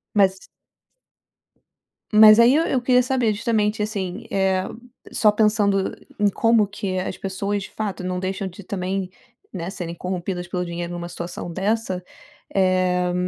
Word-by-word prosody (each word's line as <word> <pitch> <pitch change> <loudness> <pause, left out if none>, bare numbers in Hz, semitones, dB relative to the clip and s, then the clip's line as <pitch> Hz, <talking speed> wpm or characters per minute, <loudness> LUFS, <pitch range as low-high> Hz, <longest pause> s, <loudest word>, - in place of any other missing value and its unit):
Mas 190 -2 +3 1.7
Mas 215 +1 +8
aí 240 +4 +6
eu 325 - +3
eu 255 -6 0
queria 250 0 +4
saber, 250 -4 +1
justamente, 210 -1 0
assim, 200 -1 -4
eh, 190 -1 +1 0.5
só 210 -2 +4
pensando 210 -2 +2 0.3
em 205 - +4
como 225 0 +3
que 195 -2 -4
as 185 - -3
pessoas, 200 +1 -3
de - - -9
fato, 200 -4 -4
não 180 0 -2
deixam 190 +1 -3
de 190 +2 -10
também, 185 0 -3 0.4
né, 175 -2 -4
serem 175 -4 -5
corrompidas 180 0 -4
pelo 180 0 -2
dinheiro 170 0 -5
numa 175 0 -5
situação 175 0 -6
dessa, 195 -1 -1 0.5
eh, 185 -1 +2
195 Hz, 145 wpm, -22 LUFS, 180-215 Hz, 1.7 s, Mas